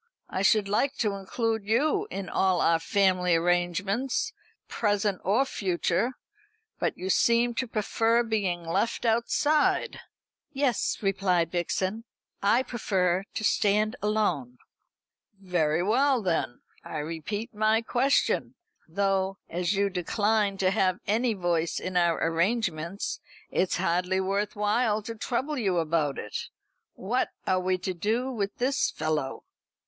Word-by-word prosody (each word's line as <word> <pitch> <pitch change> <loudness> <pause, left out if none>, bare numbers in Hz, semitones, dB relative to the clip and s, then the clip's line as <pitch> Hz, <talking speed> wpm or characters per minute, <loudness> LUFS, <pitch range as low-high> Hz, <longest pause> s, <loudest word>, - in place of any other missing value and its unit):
I 190 - -1
should 200 +1 +3
like 245 +8 +1
to 210 -3 0
include 220 +3 -2
you 305 - +1
in 195 -2 -5
all 190 -2 +1
our 165 0 +3
family 185 -1 +2
arrangements, 180 - 0 0.3
present 205 -3 0
or 220 +9 +2
future; 190 +1 -1 0.7
but - - -1
you 185 +1 -2
seem 235 +3 +3
to 255 +2 -2
prefer 225 +2 +1
being 200 -6 -1
left 225 +8 -1
outside." 260 +6 +2 0.5
"Yes," 275 -5 0
replied 185 -4 +1
Vixen, 185 +5 -2 0.4
"I 230 +6 +3
prefer 190 -6 0
to - - -3
stand 210 +2 +2
alone." 180 - 0 0.8
"Very 175 -4 0
well 255 +4 +2
then. 165 -9 -1 0.2
I 155 - -6
repeat 165 +10 -4
my 215 +2 +2
question 260 +4 +1 0.3
though, 195 +2 0
as 175 +3 0
you 200 +1 +2
decline 205 +2 0
to 190 -1 +2
have 190 -3 +2
any 225 +2 +1
voice 170 -3 0
in 185 0 -5
our 170 -2 +3
arrangements, 170 0 -1 0.3
it's 185 - +1
hardly 180 +2 +1
worth 200 +2 -1
while 210 +1 +1
to 230 - -5
trouble 260 +6 -2
you 195 -6 +1
about 155 -4 0
it 105 - -5 0.5
what 235 +7 -1 0.2
are 185 - +2
we 185 0 0
to 185 +1 -3
do 225 +9 -1
with 205 -5 -3
this 265 +3 +1
fellow?" 150 -4 -2
200 Hz, 130 wpm, -27 LUFS, 180-225 Hz, 0.8 s, should